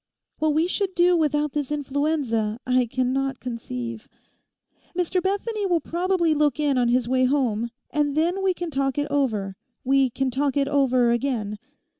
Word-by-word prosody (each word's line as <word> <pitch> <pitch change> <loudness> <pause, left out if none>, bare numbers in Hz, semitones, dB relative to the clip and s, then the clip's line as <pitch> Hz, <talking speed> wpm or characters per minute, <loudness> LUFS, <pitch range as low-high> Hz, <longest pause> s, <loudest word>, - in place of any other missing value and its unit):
What 310 -1 +1
we 320 +2 +3
should 380 +1 -1
do 350 +1 +4
without 300 -2 +1
this 290 -1 -3
influenza, 280 -6 -1
I 250 -1 +2
cannot 260 +2 -1
conceive. 125 - -6 0.9
Mr 360 +1 +1
Bethany 405 +2 -1
will 350 -2 +2
probably 345 -1 0
look 295 -2 +1
in 290 -2 +2
on 245 -1 +2
his 240 0 +2
way 255 +1 +2
home; 240 -4 0 0.2
and 295 -1 0
then 350 +5 +1
we 380 -1 +1
can 345 -2 -4
talk 270 -1 -1
it 290 - +1
over—we 255 +2 0
can 265 +2 -1
talk 275 +2 0
it 275 -1 +2
over 255 -4 +3
again. 235 -5 -1
275 Hz, 160 wpm, -24 LUFS, 250-315 Hz, 0.9 s, do